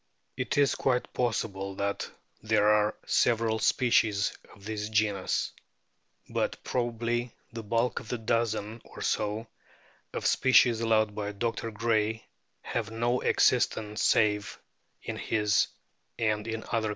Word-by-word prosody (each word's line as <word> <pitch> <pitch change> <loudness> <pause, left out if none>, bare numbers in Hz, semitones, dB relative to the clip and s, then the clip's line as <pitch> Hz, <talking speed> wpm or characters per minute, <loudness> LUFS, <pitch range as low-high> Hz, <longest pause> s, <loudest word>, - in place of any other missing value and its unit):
It - - -2
is 140 -1 +4
quite 125 -2 0
possible 100 -5 -2
that 100 +1 -2 0.3
there 110 -1 +2
are 105 0 +3
several 115 -2 +2
species 110 -3 +2 0.2
of 100 - -16
the 110 0 -3
genus. 105 -3 0 0.8
But - - -2
probably 120 0 -2 0.2
the 115 - -5
bulk 115 +2 0
of - - -12
the 125 - -1
dozen 115 -1 -1
or - - -9
so 105 +2 -1 0.7
of - - -5
species 120 -3 +4
allowed 110 -2 +2
by 105 -1 -4
Dr. 115 +2 -2
Gray 110 0 0 0.4
have 115 -3 -3
no 120 +2 0
existence 105 -1 +2
save 105 -2 +2 0.5
in - - -4
his 105 -2 +2 0.5
and 110 -2 0
in 115 0 -3
other - - -12
catalogues. 115 -2 +1
110 Hz, 130 wpm, -29 LUFS, 105-115 Hz, 0.8 s, is